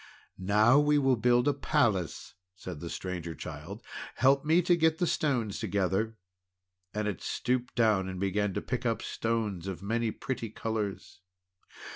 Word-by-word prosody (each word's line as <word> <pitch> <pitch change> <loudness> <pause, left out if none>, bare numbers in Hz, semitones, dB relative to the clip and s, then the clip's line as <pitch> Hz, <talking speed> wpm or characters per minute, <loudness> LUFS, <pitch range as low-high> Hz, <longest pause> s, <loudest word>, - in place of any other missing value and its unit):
"Now 105 +8 +5
we 150 0 +4
will 135 -2 +3
build 120 +2 +3
a 145 - +4
palace!" 120 - 0 0.2
said 90 -3 -7
the 85 - -6
Stranger 85 -3 -5
Child. - - -8 0.3
"Help 135 +3 +4
me 165 +4 +4
to 175 +1 +4
get 160 -1 +3
the 180 - +1
stones 125 - 0
together." 100 +3 0 0.7
And 105 0 -2
it 100 -5 -3
stooped 125 0 -1
down 105 -5 +3
and 95 -1 -5
began 100 +1 0
to - - -2
pick - - -3
up - - 0
stones 110 -6 -2
of 95 -1 -5
many 115 +2 0
pretty 120 +1 -4
colours. 100 -4 -4
110 Hz, 155 wpm, -30 LUFS, 95-130 Hz, 0.7 s, Now